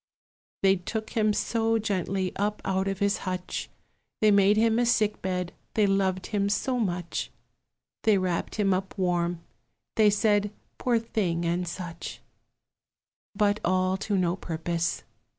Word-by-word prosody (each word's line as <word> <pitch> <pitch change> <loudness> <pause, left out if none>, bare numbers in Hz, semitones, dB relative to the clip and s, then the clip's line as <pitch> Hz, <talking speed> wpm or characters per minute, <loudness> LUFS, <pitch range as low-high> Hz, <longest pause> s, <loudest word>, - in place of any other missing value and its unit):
They 195 0 +5
took 215 +5 -5
him 215 -2 +2
so 225 +1 +1
gently 195 -3 -1
up 205 +1 -1
out 190 0 0
of 195 -1 -1
his 200 +1 +1
hutch, 185 -1 -4 0.5
They 215 -1 +5
made 200 +1 +5
him 225 +1 +3
a 245 - +3
sick 215 -3 +2
bed, 180 -1 -2 0.2
they 215 -2 +4
loved 190 -2 +1
him 200 -1 +1
so 250 +5 0
much; 175 -5 -2 0.7
They 215 -2 +4
wrapped 185 -2 -1
him 200 -3 +2
up 190 +2 -3
warm; 175 -2 0 0.6
they 215 -1 +6
said, 205 0 +2 0.3
Poor 245 -2 +2
thing, 190 -7 -1
and 175 +1 0
such; 170 -1 -6 1.2
But 210 0 +2
all 185 +1 +2
to 200 0 -1
no 175 -1 +1
purpose. 170 -1 -2
195 Hz, 145 wpm, -27 LUFS, 180-210 Hz, 1.2 s, they